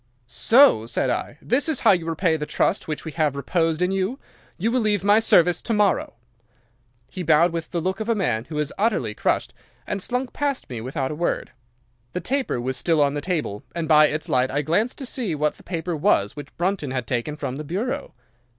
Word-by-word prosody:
"'"So!" 120 - +4
said 120 - 0
I. - - -3
"This 270 +7 +1
is 310 - 0
how - - +6
you 175 -4 +1
repay 165 0 +1
the 150 -1 -4
trust - - 0
which 155 0 -4
we 160 - -4
have 150 -3 0
reposed 165 +4 0
in 180 - +1
you. 195 +6 -1 0.4
You 220 +6 0
will 255 - +2
leave 210 -4 +1
my 205 +2 +5
service 175 -5 +4
to 230 - -1
morrow." 205 - +1 1.0
"'He 185 - -5
bowed 165 +1 +4
with 165 -1 -4
the 175 - -2
look 185 +3 -2
of 220 +1 -4
a 230 - +3
man 120 - -1
who 150 +2 -6
is 150 -1 -1
utterly 200 - +1
crushed, - - -1 0.3
and 200 - -3
slunk 250 +4 -2
past 285 - -2
me 115 -3 -5
without 130 +3 -3
a - - -4
word. 170 +3 -2 0.6
The - - -2
taper 260 - -1
was 130 +1 -2
still 165 +4 +1
on 140 -1 +3
the 145 - -3
table, 150 - -2
and 170 -2 -2
by 155 -1 +6
its 155 +3 -3
light 130 -4 +2
I 145 +2 -1
glanced 210 +11 0
to 270 - -6
see 235 - -2
what 150 0 0
the - - -16
paper 170 -1 -3
was 105 -8 +2
which 145 -1 -10
Brunton 175 -4 -1
had 130 -2 -3
taken 125 +4 -2
from 130 -3 -4
the 150 - -5
bureau. 200 - -3
165 Hz, 220 wpm, -23 LUFS, 145-200 Hz, 1.0 s, how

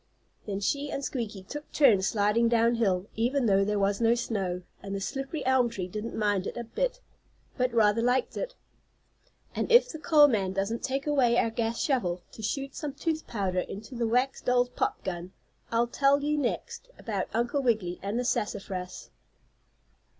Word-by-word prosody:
Then 200 -1 -3
she 285 +8 -1
and 275 -1 -3
Squeaky 220 -7 -4
took 295 +10 -8
turns 215 -10 +4
sliding 215 +2 +2
down 230 0 +3
hill, 195 -6 +1
even 245 +4 +1
though 195 -2 +4
there 210 +1 0
was 200 +2 +1
no 230 +1 +4
snow, 190 -7 -2 0.2
and 195 0 -5
the - - -2
slippery 270 +7 -4
elm 260 -2 +3
tree 190 -6 -4
didn't 215 +5 -5
mind 205 -3 +1
it - - -6
a 240 - -3
bit, - - -2 0.5
but 255 -1 +1
rather 225 -1 +3
liked 250 +2 +1
it. - - -4 1.0
And - - -2
if 485 +1 +7
the 315 - -7
coal 300 -2 +6
man 195 -7 0
doesn't 200 +4 -1
take 270 +1 -2
away 260 -5 +3
our 230 - +2
gas 230 0 -2
shovel 185 - 0
to - - -10
shoot 275 +5 -3
some 295 -2 -5
tooth 315 +1 -2
powder 190 -5 -1
into 210 +6 -6
the 235 -1 -1
wax 250 +4 +1
doll's 245 0 +2
pop - - -2
gun, 180 -1 -5 0.4
I'll 230 +1 +3
tell 280 +3 +2
you 300 +1 +1
next 295 - -3
about 200 -5 -3
Uncle 240 +5 0
Wiggily 210 -9 0
and 200 +4 -2
the 250 - -1
sassafras. 195 -5 -3
230 Hz, 180 wpm, -28 LUFS, 200-270 Hz, 1.0 s, if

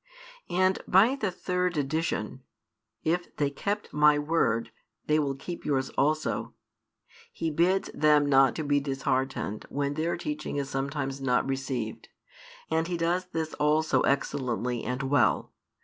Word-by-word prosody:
And 185 +1 +2
by 215 +8 +5
the 220 -8 -1
third 180 -1 -1
addition, 140 -4 -2 0.6
If 175 +2 -1
they 145 -1 +1
kept 205 +8 -3
My 150 0 +5
word, 115 -7 0 0.3
they 150 0 +3
will 140 -2 0
keep 170 +6 -7
yours 135 -3 0
also, 155 +2 0 0.8
He 165 -1 -2
bids 175 +5 +1
them 150 -1 +4
not 135 -2 +4
to 160 - -3
be 145 -1 +2
disheartened 135 -5 -2
when 140 0 -1
their 160 +3 -1
teaching 150 0 -4
is 140 -1 -2
sometimes 135 0 -3
not 125 -1 +1
received; 130 -4 -3 0.6
and 160 +1 +1
He 175 -1 -2
does 175 +2 0
this 160 -3 -3
also 155 +1 +3
excellently 125 -3 -1
and 125 +3 -3
well. 140 +2 +2
145 Hz, 140 wpm, -28 LUFS, 135-165 Hz, 0.8 s, by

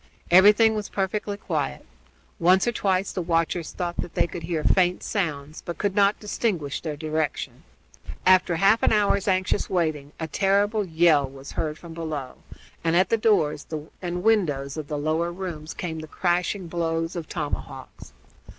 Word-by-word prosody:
Everything 210 +5 +7
was 210 -2 -4
perfectly 200 +1 -2
quiet. 155 - -3 0.5
Once 185 +3 +4
or 240 - +2
twice 195 -3 0
the 185 - -3
watchers 165 -1 0
thought 175 -1 -4
that - - -5
they - - +3
could 170 0 -7
hear 165 -2 -2
faint 180 -1 +2
sounds, 155 -7 -3
but 170 - -6
could 205 -2 -1
not 200 0 +3
distinguish 195 - -2
their 155 -3 -4
direction. 155 0 -3 0.6
After 185 -2 +5
half 195 +6 +4
an - - +3
hour's 205 -2 +2
anxious 190 +1 +1
waiting 155 -5 -1
a 160 - -3
terrible 205 +4 +2
yell 160 -5 +3
was 135 +1 -10
heard 155 -1 -3
from 170 0 -11
below, 155 -6 -5 0.5
and 165 0 +1
at 185 +1 +4
the - - +4
doors 190 -10 +1 0.3
and 180 0 -3
windows 150 -11 +1
of 155 -2 -5
the 150 - -3
lower 160 +3 0
rooms 170 -4 -6
came 160 -3 -4
the 155 - -8
crashing 180 +3 -1
blows 165 0 -2
of 165 -3 -5
tomahawks. 150 -4 -6
175 Hz, 165 wpm, -25 LUFS, 155-195 Hz, 0.6 s, Everything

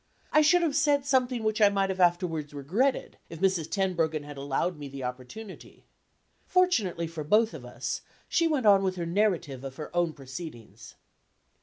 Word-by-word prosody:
I 305 - +6
should 345 +4 +4
have 305 -4 0
said 290 -2 +2
something 255 -4 +1
which 215 0 0
I 205 - +7
might 195 -1 0
have 190 - -5
afterward 175 -4 +1
regretted, 190 - -1
if 165 - -9
Mrs. 185 -5 +1
Tenbruggen 165 -6 0
had 145 0 -9
allowed 140 +5 -2
me 145 - -6
the 135 -1 -7
opportunity. 130 - -8 0.6
Fortunately 230 - +1
for 165 -1 -6
both 215 +8 +3
of - - -8
us, - - -4 0.3
she 335 - +2
went 295 -7 0
on 200 -2 +7
with 190 -1 -1
her 175 -2 -3
narrative 170 -8 0
of 135 -1 -7
her 155 +4 -8
own 175 -2 +1
proceedings. 130 - -10
180 Hz, 175 wpm, -28 LUFS, 150-220 Hz, 0.6 s, I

